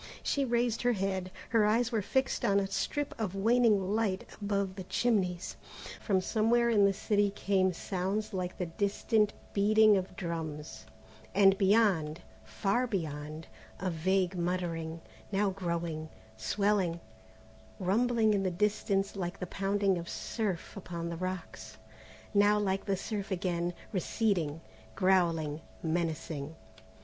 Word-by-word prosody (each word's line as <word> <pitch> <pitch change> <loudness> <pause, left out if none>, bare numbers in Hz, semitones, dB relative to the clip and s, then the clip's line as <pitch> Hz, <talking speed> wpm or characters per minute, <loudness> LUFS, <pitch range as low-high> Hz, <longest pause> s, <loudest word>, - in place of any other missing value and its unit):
She 280 -1 +1
raised 235 -1 +1
her 245 0 +3
head. 190 -2 -2 0.2
Her 225 -2 +4
eyes 230 +3 +2
were 225 -3 +1
fixed 265 +6 0
on 200 0 +4
a 195 - 0
strip 285 +8 -2
of 195 -3 -2
waning 210 -2 +3
light 210 -4 0 0.2
above 200 -2 -1
the 190 - -6
chimneys. 190 -6 0 0.4
From 190 -4 +2
somewhere 235 +4 +2
in 205 -3 +5
the 200 - +4
city 205 +1 +1
came 195 -2 +1
sounds 195 +4 -2
like 180 -1 -3
the 180 - -1
distant 205 +4 +1 0.2
beating 215 +1 +5
of 185 0 -4
drums, 160 - -5 0.5
and 195 -1 +6
beyond, 195 -6 +3 0.2
far 235 +5 0
beyond, 155 -6 -4 0.3
a 185 -1 -1
vague 185 +3 +1
muttering, 170 -2 -2 0.3
now 200 0 +2
growing, 170 -4 -3 0.3
swelling, 185 - +1 0.8
rumbling 220 +3 +2
in 200 - +1
the 190 - +1
distance 200 +1 0
like 180 -1 -4
the 180 - -3
pounding 195 0 0
of 170 - -7
surf 205 -7 -3
upon 170 -3 -5
the 170 - -4
rocks, 185 0 -5 0.6
now 205 +1 +5
like 195 -2 0
the 195 -2 0
surf 200 +1 -4
again, 175 -2 -1 0.2
receding, 180 -6 0 0.3
growling, 165 -5 +2 0.2
menacing. 160 -2 -2
195 Hz, 135 wpm, -31 LUFS, 175-210 Hz, 0.8 s, and